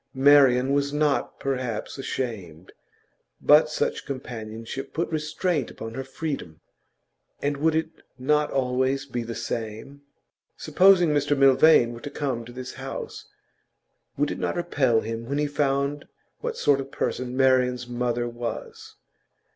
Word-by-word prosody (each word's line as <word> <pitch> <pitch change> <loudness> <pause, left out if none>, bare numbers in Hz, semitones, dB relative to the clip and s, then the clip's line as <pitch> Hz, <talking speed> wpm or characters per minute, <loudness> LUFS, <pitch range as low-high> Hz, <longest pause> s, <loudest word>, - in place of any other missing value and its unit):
Marian 135 -1 +5
was 140 0 +1
not 150 -1 0
perhaps 130 -2 -3
ashamed, 95 -11 -5 0.7
but 150 +1 +5
such 150 - -1
companionship 115 -2 -6
put 170 +3 0
restraint 155 -1 -1
upon 115 0 -8
her 135 - -4
freedom. 135 - -5 0.8
And 145 0 -1
would 160 +2 +2
it 160 0 -1 0.3
not 150 +3 +1
always 130 +1 0
be 125 -3 -4
the 115 0 -6
same? 115 +4 -5 0.6
Supposing 185 -3 +5
Mr 145 -1 +1
Milvain 135 -2 +5
were 120 - -10
to 145 - -6
come 130 -6 -3
to 120 - -10
this 125 +1 -7
house, - - -7 0.9
would 145 +1 +1
it - - -5
not - - -1
repel 130 -9 +1
him 115 +2 -5
when 140 - -1
he 150 - +1
found 145 0 -1 0.3
what 475 -1 -4
sort 140 -1 +3
of 135 0 -5
person 125 0 -3
Marian's 125 -2 +2
mother 120 0 -1
was? 120 -1 -7
135 Hz, 140 wpm, -25 LUFS, 120-145 Hz, 0.9 s, Marian